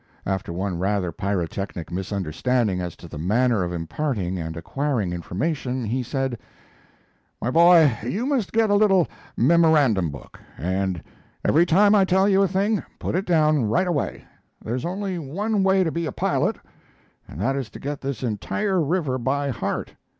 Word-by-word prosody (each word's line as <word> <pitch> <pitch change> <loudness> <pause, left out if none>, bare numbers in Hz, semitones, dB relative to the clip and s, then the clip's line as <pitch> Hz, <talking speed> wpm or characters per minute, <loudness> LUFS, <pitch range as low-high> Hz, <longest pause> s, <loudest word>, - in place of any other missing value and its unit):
After 95 -2 -2
one 90 0 -3
rather 95 -2 0
pyrotechnic 95 -2 -3
misunderstanding 95 - -1
as 90 -2 -5
to - - -12
the 75 - -8
manner 110 +4 +2
of 90 - -3
imparting 95 - -2
and 80 0 -5
acquiring 115 - -2
information 125 - -2
he 125 +5 -1
said: 130 -1 -2 1.0
"My 120 - -1
boy, 165 -4 +6
you 185 - -2
must 265 -8 0
get 220 -2 +2
a - - +4
little 200 -4 +4 0.3
memorandum 150 - +4
book, 70 -1 -11 0.2
and 95 +2 -2 0.4
every 170 +3 +4
time 200 +5 +5
I 205 -2 +5
tell 190 +1 +3
you 195 -1 +4
a 195 - +4
thing 200 +3 +1 0.2
put - - -3
it 185 +3 0
down 155 -6 +3
right 170 - +2
away. 170 -6 -2 0.3
There's 120 +5 -4
only 190 0 -3
one 200 +9 -1
way 190 0 +4
to 165 - -1
be 165 0 -2
a - - -3
pilot, - - 0 0.7
and 75 - -10
that 135 +7 0
is 135 -5 -3
to - - -11
get 145 0 -5
this 135 -1 -4
entire 180 - -1
river 150 -4 0
by 140 +3 0
heart. 115 - -3
135 Hz, 165 wpm, -23 LUFS, -, 1.0 s, boy